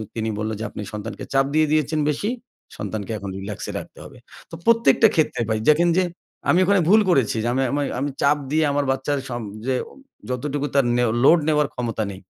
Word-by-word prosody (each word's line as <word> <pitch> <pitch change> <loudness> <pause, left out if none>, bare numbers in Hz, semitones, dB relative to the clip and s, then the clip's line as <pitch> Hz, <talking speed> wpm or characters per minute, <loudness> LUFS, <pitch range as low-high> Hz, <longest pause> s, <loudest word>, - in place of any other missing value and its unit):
তিনি 110 -1 -2
বলল 110 +1 -2
যে, - - -4
"আপনি - - -7
সন্তানকে 105 -1 -6
চাপ 135 0 +4
দিয়ে 155 -1 +4
দিয়েছেন 155 0 +1
বেশি। 175 +8 -1 0.5
সন্তানকে 105 0 -5
এখন 100 0 -6
রিল্যাক্স 100 +1 -6
এ - - -10
রাখতে - - -12
হবে।" - - -13 0.3
তো - - -6
প্রত্যেকটা 230 0 +5
ক্ষেত্রে 155 -6 +1
ভাই 110 0 0
দেখেন 170 +3 +4
যে 185 - +4 0.5
আমি 175 - +5
ওখানে 200 -1 +3
ভুল 215 +2 +7
করেছি 130 -9 +2
যে - - -1
আমি 130 - +1
আমি 145 +1 0 0.2
আমি 145 +2 -1
চাপ 145 +1 +4
দিয়ে 155 +1 +2
আমার 145 0 0
বাচ্চার 135 +2 -1
সব 120 -1 -4 0.3
যে 130 - +1 0.2
উ - - -16 0.4
যতটুকু 140 +3 -2
তার 140 -2 +4
নেও 120 -2 +2
লোড 170 +5 +7
নেওয়ার 150 -2 +2
ক্ষমতা 115 -3 -2
নেই। 95 0 -10
140 Hz, 210 wpm, -22 LUFS, 115-155 Hz, 0.5 s, ভুল